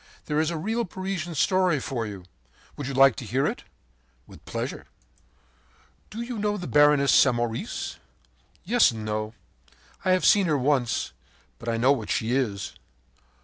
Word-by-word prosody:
There 150 0 0
is 160 0 +1
a 170 - -3
real 225 +8 -1
Parisian 185 -3 -4
story 185 0 +2
for 120 -4 -3
you! 100 -4 -9 0.5
Would 145 - -5
you 140 - -4
like 135 -2 +6
to - - -5
hear 130 +5 0
it?” - - -3 0.6
“With - - -16
pleasure.” - - -5 1.2
“Do 225 +2 -5
you 235 -2 -5
know 210 0 0
the 180 - -6
Baroness 145 -2 +4
Samoris?” 120 -3 +1 0.7
“Yes 240 +5 +4
and 110 -2 -6
no. 110 +1 -3 0.7
I 185 - +3
have 185 - +1
seen 200 -3 +5
her 150 -2 +2
once, 130 -2 0 0.5
but 115 - -5
I 115 - 0
know 125 +4 +4
what 115 -7 -1
she 110 +1 0
is! 100 -8 -2
140 Hz, 160 wpm, -26 LUFS, 115-185 Hz, 1.2 s, like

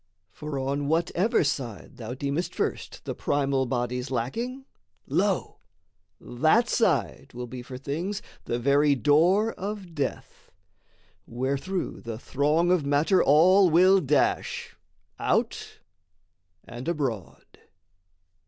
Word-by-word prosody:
For 150 +8 -6
on 140 +2 -2
whatever 175 - +1
side 130 -8 -4
thou 120 +1 -6
deemest 140 +6 -3
first - - -3
The - - -3
primal 135 -2 0
bodies 125 +1 -2
lacking, 230 - -3 0.4
lo, - - -1 0.6
that 155 - +2
side 160 - 0
Will 125 0 -5
be 125 +1 -8
for 125 +1 -8
things 170 +10 -4 0.2
the 120 - -1
very 140 +3 +3
door 170 - +3
of 195 -3 -6
death: 145 -4 -5 0.8
Wherethrough 140 +10 -3
the 115 -2 -6
throng 150 +8 +1
of 180 -4 +2
matter 145 +7 +3
all 180 +6 +6
will 185 +4 +5
dash, 145 -1 0 0.4
Out - - -1 0.9
and 120 +5 -9
abroad. 135 - -3
145 Hz, 110 wpm, -26 LUFS, 130-180 Hz, 0.9 s, all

